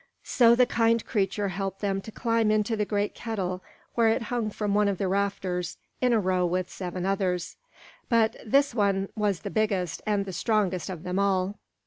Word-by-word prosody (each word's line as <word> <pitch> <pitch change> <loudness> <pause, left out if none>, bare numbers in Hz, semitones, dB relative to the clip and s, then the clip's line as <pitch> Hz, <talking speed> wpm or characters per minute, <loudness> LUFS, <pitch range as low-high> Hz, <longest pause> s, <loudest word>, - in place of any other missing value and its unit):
So 235 -2 +5
the 250 +1 +5
kind 230 -1 +2
creature 200 -2 0
helped 195 +1 -4
them 195 -1 0
to 220 - -9
climb 230 -1 +1
into 215 +1 +1
the 210 -1 0
great 205 0 -1
kettle 190 -5 -3 0.3
where 230 -1 +3
it 225 +2 +1
hung 230 -3 0
from 205 -1 -2
one 210 0 +3
of 200 -2 0
the 195 - -1
rafters 190 -2 -1 0.2
in 250 -1 +3
a 230 - +4
row 185 -2 +1
with 180 +1 -1
seven 180 -1 -4
others; 190 -3 -1 0.5
but 225 -2 +3
this 275 +4 +3
one 195 -3 +1
was 205 -4 0
the - - -5
biggest 200 -6 0
and 205 -2 +1
the 190 - -6
strongest 190 -3 0
of 180 -3 -6
them 180 +1 -2
all. 195 -1 +1
200 Hz, 190 wpm, -27 LUFS, 185-220 Hz, 0.5 s, So